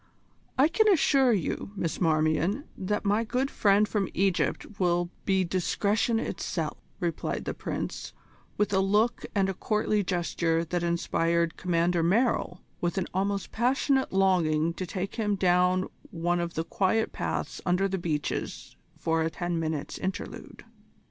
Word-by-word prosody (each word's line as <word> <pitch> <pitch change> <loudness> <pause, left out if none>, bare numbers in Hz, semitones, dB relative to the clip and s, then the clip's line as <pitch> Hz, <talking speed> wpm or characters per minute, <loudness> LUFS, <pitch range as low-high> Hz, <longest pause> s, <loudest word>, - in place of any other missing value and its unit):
"I 270 +3 +6
can 435 +6 +3
assure 275 -8 +4
you, 200 0 -2
Miss 170 -3 -3
Marmion, 160 - +2
that 205 +3 -2
my 205 +3 +2
good 255 +4 -1
friend 205 +1 +3
from 205 -3 -1
Egypt 195 +2 0
will 175 -1 +1
be 190 -1 +3
discretion 200 +5 +1
itself," 165 -5 -3 0.2
replied 170 -4 -2
the - - -2
Prince, - - -4 0.5
with 210 -1 +1
a 190 - +4
look 210 +5 +2
and 195 -1 +3
a 195 - -1
courtly 210 +1 0
gesture 170 -2 0
that 175 +2 -2
inspired 170 -1 +1
Commander 175 -1 +1
Merrill 185 0 +1 0.2
with 175 +2 -1
an 190 - +1
almost 195 +1 -1
passionate 265 +3 +1
longing 170 -4 +2
to 185 +2 -5
take 190 +2 -4
him 210 -3 +1
down 180 0 +3 0.2
one 175 +1 0
of 170 0 -3
the 160 - 0
quiet 200 +6 +1
paths - - -3
under 180 +2 +2
the 190 -1 -2
beeches 155 -4 -3 0.2
for 165 0 0
a 160 - +1
ten 175 0 -2
minutes' 155 -3 -3
interlude. 190 +1 -6
185 Hz, 150 wpm, -28 LUFS, 170-210 Hz, 0.5 s, I